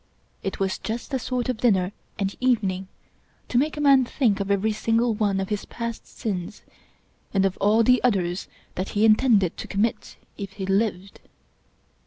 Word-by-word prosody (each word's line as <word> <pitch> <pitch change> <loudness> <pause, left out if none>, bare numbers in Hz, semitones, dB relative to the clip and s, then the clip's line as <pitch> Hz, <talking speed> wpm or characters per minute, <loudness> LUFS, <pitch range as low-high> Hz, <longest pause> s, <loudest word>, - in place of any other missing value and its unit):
It 195 - -4
was 190 -1 -1
just 230 +5 -5
the 265 - 0
sort 250 -1 -2
of 255 -3 -1
dinner 195 -6 +2 0.3
and 195 -1 -2
evening 200 -7 +1 0.6
to 245 - +3
make 300 +3 0
a - - -2
man 275 -2 +6
think 235 -5 +1
of 200 0 -3
every 200 +2 +2
single 230 +2 +1
one 205 -2 0
of 190 - -3
his 210 -1 -2
past 230 -1 -6
sins, 200 -3 -5 0.7
and 195 0 +4
of 190 -1 0
all 215 +3 +3
the 250 +2 +4
others 190 -6 0 0.3
that 185 +2 -3
he 215 - +5
intended 215 -5 +4
to - - -6
commit 210 +3 -1 0.2
if 200 -1 -6
he 195 -1 -5
lived. 195 -1 -1
210 Hz, 175 wpm, -24 LUFS, 195-235 Hz, 0.7 s, man